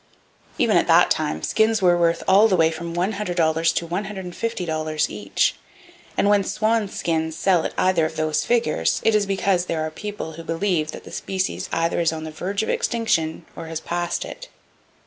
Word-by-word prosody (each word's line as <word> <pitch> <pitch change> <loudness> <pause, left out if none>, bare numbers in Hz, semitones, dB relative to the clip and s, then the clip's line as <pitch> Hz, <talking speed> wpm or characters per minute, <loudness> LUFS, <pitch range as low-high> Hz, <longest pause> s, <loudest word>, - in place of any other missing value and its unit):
Even - - +3
at - - +2
that - - +5
time, 80 0 -1
skins 220 0 +2
were 180 -2 +4
worth 170 -1 +1
all 200 +3 +6
the 195 - +2
way 165 -2 +3
from 170 +1 -6
$100 185 +5 0 0.6
to 170 - -1
$150 180 -4 -2
each; - - 0 0.6
and - - +3
when 205 -1 +4
swan 215 +1 0
skins 160 -3 -2
sell 180 -2 +2
at - - -3
either 185 -4 +3
of 160 - -10
those 155 -1 0
figures 230 - +1
it 225 - +4
is 210 -2 +2
because 190 -2 +1
there 160 -1 -1
are 155 - -4
people 205 -1 -6
who 165 +1 -9
believe 165 -1 -1
that - - -9
the - - -12
species 190 -1 -3
either 165 +1 0
is 165 -1 +2
on 160 -1 -5
the 160 - -6
verge 190 +7 -2
of - - -4
extinction, 165 -9 0
or 165 - -7
has 160 -1 -4
passed 175 +1 -2
it. - - -9
175 Hz, 185 wpm, -22 LUFS, 160-200 Hz, 0.6 s, all